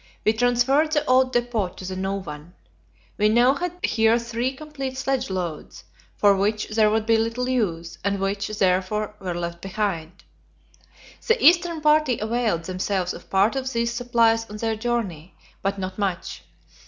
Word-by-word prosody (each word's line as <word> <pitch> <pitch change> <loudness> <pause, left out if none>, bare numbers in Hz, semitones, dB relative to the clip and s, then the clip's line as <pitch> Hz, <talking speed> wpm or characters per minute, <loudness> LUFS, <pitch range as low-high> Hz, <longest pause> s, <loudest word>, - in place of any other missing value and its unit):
We 215 - +4
transferred 245 +6 +2
the 295 0 +1
old 255 -1 +3
depot 240 -5 0
to 185 +1 -11
the 185 0 -4
new 190 +1 -2
one. 165 -3 -8 0.6
We 210 +1 +4
now 240 +4 +5
had 350 +4 -3
here 225 +1 +3
three 235 +2 -2
complete 275 -2 -6
sledge 270 -3 -1
loads, 175 -5 -5 0.3
for 200 -1 +4
which 210 +2 0
there 215 0 +3
would 215 0 0
be 225 0 +4
little 230 +3 -1
use, 180 -10 -2
and 200 -1 0
which, 195 +1 -1
therefore, 205 +1 0
were 180 -3 -4
left 170 0 -4
behind. 190 -4 -3 1.0
The 455 +1 +4
eastern 340 -2 +4
party 300 -5 +3
availed 220 -6 -1
themselves 185 +1 -2
of - - -12
part 195 +6 +3
of 265 -1 -2
these 235 0 -1
supplies 230 -2 +2
on 210 - -7
their 225 0 -1
journey, 215 -8 -3 0.3
but 195 +1 -1
not 185 +1 -5
much. 190 -3 -3
220 Hz, 165 wpm, -24 LUFS, 190-245 Hz, 1.0 s, now